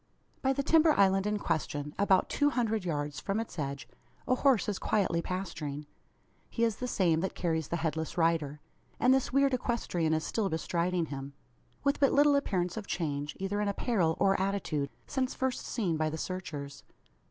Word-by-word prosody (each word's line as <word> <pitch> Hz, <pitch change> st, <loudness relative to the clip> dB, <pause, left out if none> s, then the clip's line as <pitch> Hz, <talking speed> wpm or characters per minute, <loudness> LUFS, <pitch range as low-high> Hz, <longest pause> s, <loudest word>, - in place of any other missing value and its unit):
By 265 Hz, -, +2 dB
the 280 Hz, +1 st, 0 dB
timber 320 Hz, +1 st, +5 dB
island 195 Hz, 0 st, +4 dB
in 210 Hz, 0 st, 0 dB
question 150 Hz, -5 st, -2 dB
about 195 Hz, -2 st, +4 dB
two 290 Hz, 0 st, +2 dB
hundred 225 Hz, -6 st, 0 dB
yards 145 Hz, -4 st, -2 dB
from 195 Hz, +2 st, -1 dB
its 225 Hz, -6 st, -5 dB
edge 140 Hz, -1 st, -4 dB, 0.4 s
a 255 Hz, -, +3 dB
horse 255 Hz, -5 st, +3 dB
is 205 Hz, -2 st, -2 dB
quietly 185 Hz, -5 st, +1 dB
pasturing. 155 Hz, -6 st, -4 dB, 0.6 s
He 230 Hz, -, -1 dB
is 225 Hz, -3 st, +1 dB
the 250 Hz, -, -3 dB
same 175 Hz, -8 st, +2 dB
that 190 Hz, +3 st, -2 dB
carries 160 Hz, -3 st, -1 dB
the -, -, -2 dB
headless 160 Hz, 0 st, -2 dB
rider; 160 Hz, -3 st, +1 dB, 0.4 s
and 250 Hz, +1 st, +5 dB
this 265 Hz, -2 st, +1 dB
weird 275 Hz, 0 st, +3 dB
equestrian 180 Hz, -10 st, 0 dB
is 160 Hz, -, -1 dB
still 215 Hz, -4 st, -1 dB
bestriding 170 Hz, +1 st, -1 dB
him, 140 Hz, 0 st, -6 dB, 0.5 s
with 280 Hz, +1 st, +1 dB
but 275 Hz, -3 st, +4 dB
little 290 Hz, 0 st, +5 dB
appearance 185 Hz, -9 st, 0 dB
of 210 Hz, -, -5 dB
change, 145 Hz, -3 st, -3 dB
either 200 Hz, +2 st, -1 dB
in 210 Hz, -, 0 dB
apparel 200 Hz, -5 st, +1 dB
or 195 Hz, -1 st, +3 dB
attitude, 185 Hz, -8 st, -1 dB, 0.2 s
since 265 Hz, -2 st, -2 dB
first 260 Hz, -1 st, -2 dB
seen 185 Hz, -9 st, -1 dB
by 155 Hz, 0 st, +1 dB
the 155 Hz, -, -4 dB
searchers. 145 Hz, -6 st, -5 dB
185 Hz, 180 wpm, -30 LUFS, 160-230 Hz, 0.6 s, timber